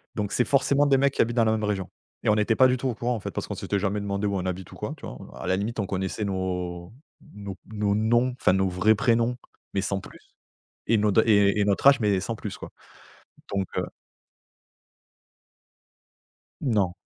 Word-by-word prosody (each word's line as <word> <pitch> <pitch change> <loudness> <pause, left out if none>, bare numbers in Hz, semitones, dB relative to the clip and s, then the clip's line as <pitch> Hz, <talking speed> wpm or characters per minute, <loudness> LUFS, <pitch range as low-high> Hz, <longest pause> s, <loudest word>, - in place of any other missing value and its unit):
Donc 105 -2 -2
c'est 125 - +2
forcément 140 +1 +3
des 140 -2 +4
mecs 140 +1 +2
qui - - +2
habitent 120 +1 0
dans 115 - +4
la 110 - +3
même 110 -1 -1
région 100 -3 -2 0.3
et - - +1
on 105 - +5
était 110 +1 +2
pas 130 - +6
du 130 0 +1
tout 130 +1 -2
au 120 - -2
courant, 120 +3 -1
en 110 - -4
fait, - - -5
parce - - -4
qu'on - - -4
s'était 100 - -2
jamais 100 +1 -1
demandé 100 0 -2
où 100 -1 0
on 90 - -2
habite 95 0 -4
ou - - -11
quoi, - - -5
tu - - -10
vois? - - -7 0.2
À - - -6
la 95 - +2
limite, 110 +4 -3
on 100 - 0
connaissait 95 +3 -3
nos 90 -2 -3 0.4
nos 100 -2 -7 0.2
nos 105 -1 0
noms, 120 +4 +2
enfin - - +3
nos 95 0 +2
vrais 95 +4 +3
prénoms, 115 +2 +1 0.4
mais 100 - +1
sans 100 0 -1
plus - - -16 0.5
et 115 - +4
nos 105 -1 +2
et 100 -2 +4
et 100 - +3
notre 100 +6 +2
âge, 140 0 +7
mais 100 -3 +2
sans 115 +4 -3
plus, 105 -2 -6
quoi. - - -9 0.8
Donc, 100 -1 0
heu - - 0 2.8
Non. 105 -9 +1
105 Hz, 220 wpm, -26 LUFS, 95-115 Hz, 2.8 s, âge